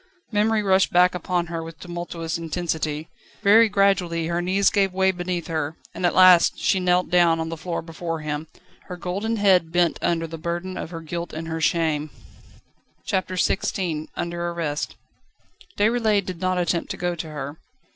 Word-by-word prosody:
Memory 215 0 +2
rushed 190 -1 +3
back 180 +1 +5
upon 180 0 -1
her 165 -1 -4
with 165 0 -9
tumultuous 175 -2 -5
intensity. 160 -2 -3 0.4
Very 220 +3 +6
gradually 190 -5 +2
her 170 +1 -1
knees 190 +3 +2
gave 195 -2 +2
beneath 180 -2 0
her, 160 -2 -3 0.2
and 180 - 0
at - - -1
last 185 -2 +7
she 190 - +1
knelt 180 -1 +1
down 170 -2 +4
on 160 0 -3
the 165 - -4
floor 165 +1 -4
before 165 -1 -5
him, 150 +1 -4 0.4
her 180 - -6
golden 195 +6 -2
head 190 -6 +3
bent 175 -1 +2
under 165 -1 0
the 165 0 -8
burden 175 +3 -4
of - - -5
her 165 -1 -7
guilt 170 +2 -5
and 160 +1 -5
her 160 0 -3
shame. 155 -2 +1 1.0
CHAPTER 185 -1 -1
XVI 175 -4 -1
Under 170 0 -3
arrest. 160 -4 -3 0.8
Déroulède 215 -2 +2
did 180 -3 -6
not 185 0 +1
attempt 170 -1 0
to - - -4
go 175 0 -1
to 165 -1 -6
her. 145 0 -6
175 Hz, 170 wpm, -23 LUFS, 165-185 Hz, 1.0 s, last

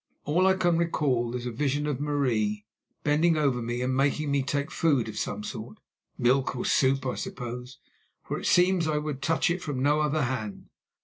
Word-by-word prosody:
All 175 +6 +3
I 190 - +4
can 175 -3 +2
recall 130 -8 0
is 125 0 -4
a 120 - -2
vision 145 +4 -1
of 145 -2 -2
Marie 115 -8 0 0.4
bending 155 +3 +3
over 135 -5 +1
me 120 +2 -2
and 130 +1 0
making 140 +2 +1
me 140 -1 +2
take 140 +2 -2
food 140 -8 +2
of 110 - -7
some 105 -1 -3
sort—milk 125 +3 -2
or 120 - -3
soup, 135 0 +2
I 130 - 0
suppose—for 125 +1 -7
it - - -3
seems 180 -2 +4
I 155 -1 +1
would 150 -2 -3
touch 165 +4 +1
it 180 +1 -2
from 140 -6 -3
no 150 +2 +3
other 150 0 +1
hand. 120 -5 -4
140 Hz, 185 wpm, -27 LUFS, 125-150 Hz, 0.4 s, I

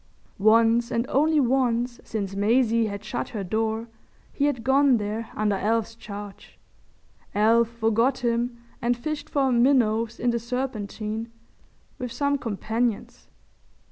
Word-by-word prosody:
Once 225 +3 +4
and 230 +1 0
only 305 +3 +3
once 245 -2 +1
since 200 -3 -4
Maisie 230 +2 +2
had 200 -1 -6
shut 215 - -3
her 210 -3 -4
door 220 +4 -1 0.5
he 285 - +1
had 280 -6 -1
gone 265 0 +4
there 215 +2 -4
under 210 -1 +1
Alf's 225 +3 0
charge. 205 -3 -10 0.8
Alf 225 +2 +4
forgot 235 +3 +1
him 235 +1 0 0.2
and 240 0 +1
fished 305 +4 -4
for 270 -2 +1
minnows 235 -3 +2
in 245 0 +1
the 235 - -1
Serpentine 225 -2 -4 0.7
with 250 -1 -4
some 285 +1 0
companions. 225 0 -3
230 Hz, 130 wpm, -25 LUFS, 220-250 Hz, 0.8 s, Once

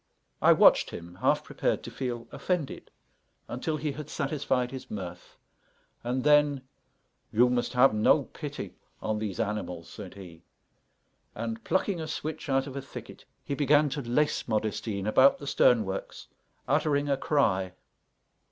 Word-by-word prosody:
I - - +7
watched - - +6
him, 85 +1 -9
half - - +2
prepared - - -1
to - - -7
feel 120 -3 -4
offended, 175 -7 -3 0.6
until 155 +6 -2
he 150 0 -2
had 150 +1 -8
satisfied 135 -3 -1
his 130 -1 -8
mirth; 90 -4 -7 0.7
and 125 +2 -1
then, 145 -2 +4 0.7
"You 125 +3 +4
must 125 0 0
have 125 -1 +5
no 105 0 +4
pity - - -7 0.3
on 110 0 -2
these 105 -1 -4
animals," 105 -6 -3
said 95 -4 -9
he; 90 -4 -11 0.9
and, 115 0 -4
plucking 185 -2 0
a 160 - -4
switch 155 0 -5
out 135 0 +2
of 140 -2 -8
a 140 - -3
thicket, 135 - -10 0.2
he - - -3
began 145 +1 +3
to 145 +2 -3
lace 135 +5 0
Modestine 110 -2 -2
about 130 +6 +5
the 145 - -9
stern 120 -5 +4
works, 95 0 -6 0.4
uttering 145 -1 +2
a 140 - +2
cry. 100 -11 +1
125 Hz, 150 wpm, -28 LUFS, 105-145 Hz, 0.9 s, I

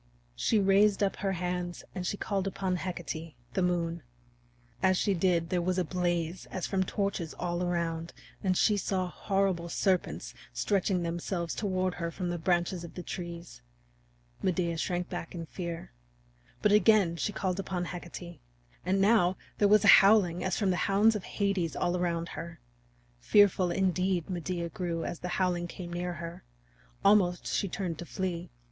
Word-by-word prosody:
She 220 - +2
raised 200 +1 +4
up 195 - 0
her 195 0 -1
hands 180 0 -3
and 180 -2 -3
she 205 - -2
called 195 -2 -1
upon 190 -1 -1
Hecate, 165 -4 -5 0.2
the 190 - +1
Moon. 170 -2 0 0.8
As 185 -1 +4
she 200 - +2
did, 170 -2 +1
there 180 -1 +1
was 180 +1 0
a 185 - +2
blaze 175 0 -2
as 185 - -3
from 190 -1 +1
torches 190 -4 -2
all 175 0 -2
around, 170 -2 -1 0.3
and 185 -2 +2
she 210 -2 +4
saw 190 -2 -1
horrible 190 -2 0
serpents 180 - 0 0.2
stretching 185 - +1
themselves 170 0 -2
toward 185 -3 -1
her 170 -1 -3
from 175 +1 -3
the 175 - -3
branches 175 +1 0
of 170 - -10
the 180 - -6
trees. 170 -1 -7 0.8
Medea 170 -2 0
shrank 175 +2 -1
back 175 -1 -6
in 165 -1 -5
fear. 170 0 -6 0.7
But 210 - +4
again 205 -4 +5
she 190 - -1
called 190 -2 -2
upon 185 -2 -2
Hecate. 175 -1 -8 0.4
And 190 +2 +1
now 195 -3 +4 0.2
there 205 - +5
was 210 +1 +5
a 200 - +10
howling 195 -4 +4
as 185 -1 0
from 200 -3 +2
the 180 - 0
hounds 210 +3 +5
of 205 - -4
Hades 195 -5 -1
all 175 - 0
around 170 -1 -1
her. 170 +1 -7 0.6
Fearful, 190 - +4
indeed, 185 -1 0
Medea 175 -1 -3
grew 170 -2 -3
as 170 - -4
the - - -4
howling 180 -2 +1
came 175 0 -7
near 175 0 -2
her; 170 0 -7 0.6
almost 190 -3 +4
she 200 - -1
turned 180 -3 -3
to 175 - -5
flee. 180 -2 -3
180 Hz, 165 wpm, -30 LUFS, 170-195 Hz, 0.8 s, a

